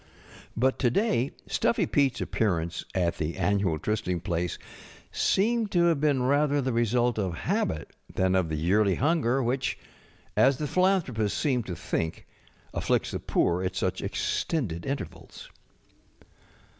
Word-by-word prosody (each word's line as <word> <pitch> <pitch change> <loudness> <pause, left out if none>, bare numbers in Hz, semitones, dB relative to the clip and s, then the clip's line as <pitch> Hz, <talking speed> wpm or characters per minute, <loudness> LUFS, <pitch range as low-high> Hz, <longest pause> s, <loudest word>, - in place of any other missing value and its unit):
But 130 +3 +2
to 125 - +3
day 145 - +1 0.2
Stuffy - - +1
PeteŌĆÖs 140 -3 +1
appearance 85 -6 -1
at 85 -2 +1
the 80 +1 -2
annual 95 -2 +1
try 105 - -1
sting 90 -5 -2
place 90 -1 -2 0.5
seemed 225 +2 +1
to 175 -1 +4
have 165 -4 +2
been 145 -4 +2
rather 145 +2 +2
the 130 -2 -1
result 120 0 +1
of 95 -4 -1
habit 80 -1 -1 0.2
than 95 0 +1
of 95 -3 +1
the 80 - -2
yearly 95 +5 +2
hunger 135 -4 +1
which, 130 +3 -1 0.6
as 135 0 +4
the 150 - -2
philanthropists 155 - +1
seem 130 -5 +1
to 90 - -5
think, 80 0 -3 0.5
afflicts - - 0
the - - -3
poor 85 +1 +1
at 95 0 -2
such - - -1
extended 105 - -2
intervals. 140 0 -6
115 Hz, 145 wpm, -27 LUFS, 90-140 Hz, 0.6 s, to